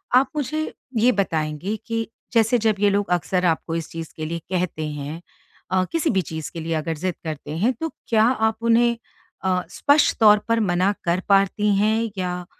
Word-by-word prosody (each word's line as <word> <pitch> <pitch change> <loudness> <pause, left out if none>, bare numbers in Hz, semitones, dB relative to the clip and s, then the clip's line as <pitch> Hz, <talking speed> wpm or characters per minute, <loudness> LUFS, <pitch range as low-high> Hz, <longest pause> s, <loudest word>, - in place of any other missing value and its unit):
आप 260 +1 +5
मुझे 305 +2 -2 0.2
ये 240 +3 +5
बताएँगे 165 -1 -1
कि 230 -1 -2 0.3
जैसे 230 +1 +4
जब 220 -2 +2
ये 205 0 +4
लोग 200 0 0
अक्सर 180 +1 +1
आपको 165 -1 0
इस 165 -1 -4
चीज़ 165 -1 -7
के 155 - -5
लिए 170 +2 -3
कहते 180 -4 -1
हैं 150 +2 -6 0.5
अ, 185 0 +3
किसी 330 -1 +1
भी 190 -8 +2
चीज़ 160 -3 -6
के 170 - -5
लिए 165 +1 -3
अगर 160 +1 -2
ज़िद 180 +3 -2
करते 155 -1 -5
हैं 225 +9 +2
तो 325 +7 -4 0.2
क्या 220 -2 +4
आप 220 -2 +2
उन्हें 235 0 +4 0.5
अ, 185 -1 +1
स्पष्ट 285 +10 +3
तौर 210 -2 +7
पर 230 0 +2
मना 185 -2 +2
कर 170 +1 +2
पाती 200 +1 +3
हैं? 220 +2 +1
या 180 -1 -3
195 Hz, 190 wpm, -23 LUFS, 165-225 Hz, 0.5 s, तौर